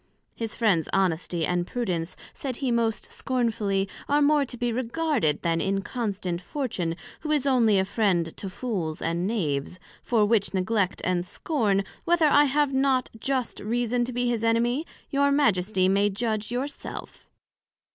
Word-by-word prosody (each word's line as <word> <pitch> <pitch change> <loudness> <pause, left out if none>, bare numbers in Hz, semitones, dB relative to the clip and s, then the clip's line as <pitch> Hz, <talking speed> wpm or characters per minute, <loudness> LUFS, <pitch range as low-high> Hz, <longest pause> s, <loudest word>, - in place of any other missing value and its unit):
His 225 -2 -5
Friends 195 -9 +2
Honesty 175 -3 +1
and 175 +1 0
Prudence, 180 -9 -2 0.2
said 265 -3 -4
he 260 0 -1
most 230 -2 0
scornfully, 215 -6 0 0.2
are 290 +1 +4
more 295 0 +4
to 245 -1 -8
be 240 -1 -1
regarded, 245 - 0
than 165 -1 +1
Inconstant 195 -2 -2
Fortune, 180 - -2 0.2
who 310 - -6
is 295 -3 +2
onely 235 -7 +4
a 190 - +2
friend 190 -6 +1
to 195 - -4
Fools 185 -7 -3
and 170 +2 -1
Knaves; 170 -6 -2 0.2
for 225 -4 +2
which 205 -2 +1
neglect 190 0 0
and 180 -1 +1
scorn, 205 - 0 0.2
whether 340 -1 +3
I 290 0 +6
have 285 0 +1
not 265 -1 +2
just 260 -1 -1
reason 240 +2 0
to 250 - -5
be 245 0 0
his 235 -2 0
enemy, 240 +6 +1 0.2
your 280 0 +3
Majesty 195 -9 +2
may 200 +2 +3
judg 215 +1 -2
your 250 +3 -1
self. 285 - -9
225 Hz, 155 wpm, -26 LUFS, 185-255 Hz, 0.2 s, I